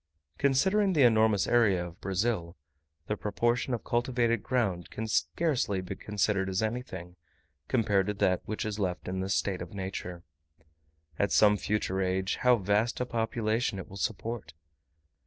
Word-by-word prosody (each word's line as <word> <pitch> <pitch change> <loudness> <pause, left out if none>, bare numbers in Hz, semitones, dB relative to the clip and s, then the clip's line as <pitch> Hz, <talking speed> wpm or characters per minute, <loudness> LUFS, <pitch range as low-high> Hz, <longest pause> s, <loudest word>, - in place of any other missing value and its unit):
Considering 190 +9 +3
the 150 -5 +4
enormous 110 -4 +4
area 100 -7 +3
of 85 +1 -11
Brazil, 95 -3 -1 0.5
the 105 - -1
proportion 120 +5 0
of 120 - -2
cultivated 120 -1 +1
ground 100 -9 -1
can 110 - -5
scarcely 100 - 0
be 95 - -5
considered 100 -2 0
as 95 +3 0
anything, 110 -7 -4 0.5
compared 105 -6 +2
to 105 - 0
that 90 -2 +2
which 110 +2 -3
is 105 0 -3
left 90 -3 -2
in 95 +1 -2
the 95 +1 -2
state 95 -1 0
of 90 +2 -8
nature: 95 -2 -5 1.0
at 100 - +1
some 105 -1 +5
future 100 -2 -1
age, 95 +1 0
how 125 -1 +5
vast 105 +3 0
a 125 - 0
population 115 -1 -1
it 95 - -7
will 95 - -11
support! 100 -1 -4
105 Hz, 155 wpm, -29 LUFS, 95-120 Hz, 1.0 s, some